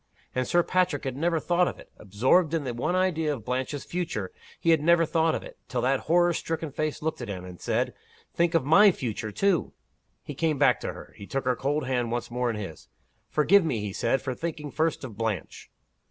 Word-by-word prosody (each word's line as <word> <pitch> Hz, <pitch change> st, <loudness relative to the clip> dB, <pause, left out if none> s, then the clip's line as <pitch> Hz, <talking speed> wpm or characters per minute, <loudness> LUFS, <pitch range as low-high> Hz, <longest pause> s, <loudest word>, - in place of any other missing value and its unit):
And 130 Hz, 0 st, -1 dB
Sir 175 Hz, 0 st, +3 dB
Patrick 180 Hz, -6 st, +1 dB
had 130 Hz, -2 st, -3 dB
never 165 Hz, +3 st, +1 dB
thought 175 Hz, +2 st, +2 dB
of -, -, -4 dB
it! -, -, -15 dB
Absorbed 130 Hz, -, +2 dB
in 160 Hz, -, -1 dB
the 125 Hz, -3 st, -3 dB
one 125 Hz, +10 st, -1 dB
idea 170 Hz, -4 st, +1 dB
of 115 Hz, -5 st, -11 dB
Blanche's 130 Hz, +3 st, -2 dB
future, 165 Hz, -, -3 dB, 0.3 s
he 165 Hz, -, +3 dB
had 160 Hz, -2 st, +4 dB
never 170 Hz, +1 st, +4 dB
thought 160 Hz, 0 st, +2 dB
of -, -, -4 dB
it, -, -, -12 dB
till 125 Hz, -2 st, -2 dB
that 130 Hz, +2 st, +2 dB
horror 175 Hz, +1 st, +4 dB
stricken 160 Hz, -1 st, -3 dB
face 155 Hz, +2 st, -3 dB
looked 160 Hz, -4 st, -2 dB
at 120 Hz, -, -5 dB
him, 95 Hz, -3 st, -5 dB
and 90 Hz, -1 st, -11 dB
said, -, -, 0 dB, 0.4 s
Think 170 Hz, 0 st, +1 dB
of 165 Hz, -, +2 dB
my 200 Hz, +8 st, +7 dB
future, 115 Hz, -, -4 dB
too! 195 Hz, -, +1 dB, 0.5 s
He 145 Hz, -, -6 dB
came 155 Hz, +1 st, 0 dB
back -, -, +4 dB
to -, -, -4 dB
her. -, -, -12 dB
He 100 Hz, -, -10 dB
took 135 Hz, -1 st, -3 dB
her 125 Hz, -1 st, +2 dB
cold 145 Hz, +2 st, -1 dB
hand 125 Hz, -3 st, -1 dB
once 120 Hz, 0 st, -3 dB
more 125 Hz, 0 st, 0 dB
in 115 Hz, -, -2 dB
his. 100 Hz, -7 st, -7 dB, 0.4 s
"Forgive 175 Hz, +7 st, +4 dB
me," 130 Hz, -9 st, -1 dB
he 105 Hz, -2 st, -4 dB
said, 115 Hz, +5 st, 0 dB
"for 130 Hz, -, -2 dB
thinking 150 Hz, 0 st, -5 dB
first 160 Hz, -1 st, 0 dB
of 115 Hz, -6 st, -8 dB
Blanche." 110 Hz, -6 st, -3 dB
145 Hz, 225 wpm, -27 LUFS, 120-165 Hz, 0.5 s, my